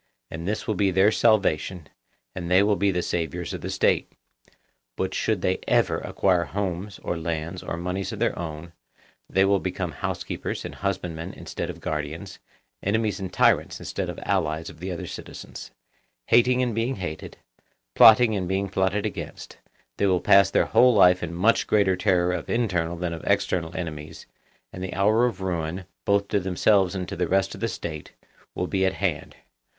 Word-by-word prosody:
And 80 +2 -6
this 105 +2 -2
will 110 - 0
be 100 0 +2
their 95 +3 +4
salvation, 95 -7 +1 0.5
and 85 -2 -5
they 95 +2 +5
will 105 0 +3
be 100 0 +1
the 90 -2 0
saviours 85 0 -3
of - - -6
the - - -5
State. - - +1 0.8
But - - -2
should - - -1
they - - +1
ever - - +2
acquire 90 -3 +1
homes 95 +3 -4
or 85 - -2
lands 85 +2 -4
or 85 - -5
moneys 90 +2 -3
of - - -6
their - - 0
own, 85 0 -7 0.6
they 95 0 +3
will 100 0 +3
become 90 -2 -3
housekeepers 70 - -4
and - - -6
husbandmen 90 -3 -4
instead - - -6
of - - -8
guardians, 80 +5 -5 0.4
enemies 110 +1 0
and 95 -2 -5
tyrants - - +2
instead - - -4
of - - -6
allies 80 +1 -1
of 80 - -17
the 90 +3 -5
other 85 - -5
citizens; - - -9 0.6
hating 125 +2 +4
and 120 -2 -1
being 115 +4 -1
hated, 90 -5 -6 0.6
plotting 110 - +7
and 95 -3 -2
being 95 +1 -1
plotted 95 +2 0
against, - - -7 0.4
they 100 - +2
will 90 -2 +3
pass 95 -1 +5
their - - +2
whole 125 -1 +5
life 90 -2 +6
in 90 - -4
much 95 +7 +2
greater 100 -3 +3
terror 90 -2 +2
of - - -4
internal 90 -8 0
than 85 -1 -3
of 80 - -7
external 85 -1 0
enemies, 80 -2 -6 0.5
and 90 - -6
the 95 - -5
hour 110 +5 +3
of 100 -6 -5
ruin, 90 0 -3 0.2
both 100 0 +2
to 105 - +2
themselves 95 +1 +2
and 90 -2 -3
to - - -5
the 90 0 -1
rest 95 +1 +1
of 100 - -10
the 115 - +1
State, 80 -7 -6 0.4
will - - -1
be 95 - 0
at 95 0 +2
hand. 90 -6 -2
95 Hz, 185 wpm, -25 LUFS, 85-100 Hz, 0.8 s, plotting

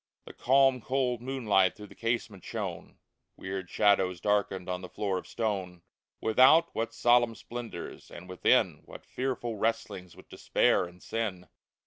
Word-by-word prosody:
The - - -11
calm, 135 -1 +3
cold 125 -1 -1
moonlight 110 -8 +1
through 105 - -10
the - - -14
casement 115 -5 -3
shone; 100 -7 -6 0.4
Weird 95 -1 -5
shadows 95 -4 +2
darkened 100 -3 0
on 90 0 -3
the 90 - -8
floor 95 -3 -2
of - - -13
stone; 95 -6 -3 0.4
Without, 130 +9 +5
what 115 +1 -2
solemn 120 -1 +3
splendors! 115 -8 -8
and 90 +1 -11
within 90 0 +2
What - - -12
fearful 125 -3 -3
wrestlings 100 -5 -3
with - - -16
despair - - +1
and 90 +1 -14
sin 100 -7 -4
105 Hz, 145 wpm, -29 LUFS, 95-120 Hz, 0.4 s, Without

